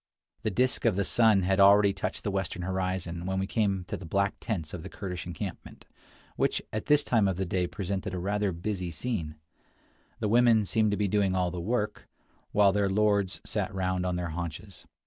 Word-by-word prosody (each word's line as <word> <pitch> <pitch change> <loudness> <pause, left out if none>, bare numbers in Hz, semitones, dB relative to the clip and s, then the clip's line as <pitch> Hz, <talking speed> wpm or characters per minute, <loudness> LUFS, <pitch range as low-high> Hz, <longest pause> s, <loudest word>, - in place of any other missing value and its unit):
The - - 0
disk 125 +7 +1
of 110 -5 +3
the 100 0 0
sun 110 -2 +4
had 95 +2 +1
already 100 0 +6
touched 95 - -4
the 100 - -1
western 95 -2 -2
horizon 90 -2 -2
when 95 0 -1
we 95 - 0
came 100 -3 0
to - - -5
the - - -8
black 100 +5 0
tents 85 -9 -4
of 90 - -5
the 95 - -8
Kurdish 90 -4 -6
encampment, 90 +1 -7 0.5
which - - +1
at 110 - -3
this 150 -1 +5
time 110 -7 +2
of 95 -2 -1
the 95 - -1
day 90 0 0
presented 100 0 -4
a 90 - -4
rather 100 +2 0
busy 90 +1 -3
scene. 85 -3 -3 0.8
The - - 0
women 115 -1 +4
seemed 110 +4 +2
to 105 - 0
be 105 - +1
doing 100 -1 +1
all 90 -1 +1
the 90 0 -4
work, 105 +2 -2 0.4
while 100 -1 +5
their 100 -1 +1
lords 100 -1 +1
sat 105 -4 -2
round 95 -1 -1
on 90 - -1
their 90 -1 -3
haunches. 85 0 -7
95 Hz, 205 wpm, -28 LUFS, 90-105 Hz, 0.8 s, already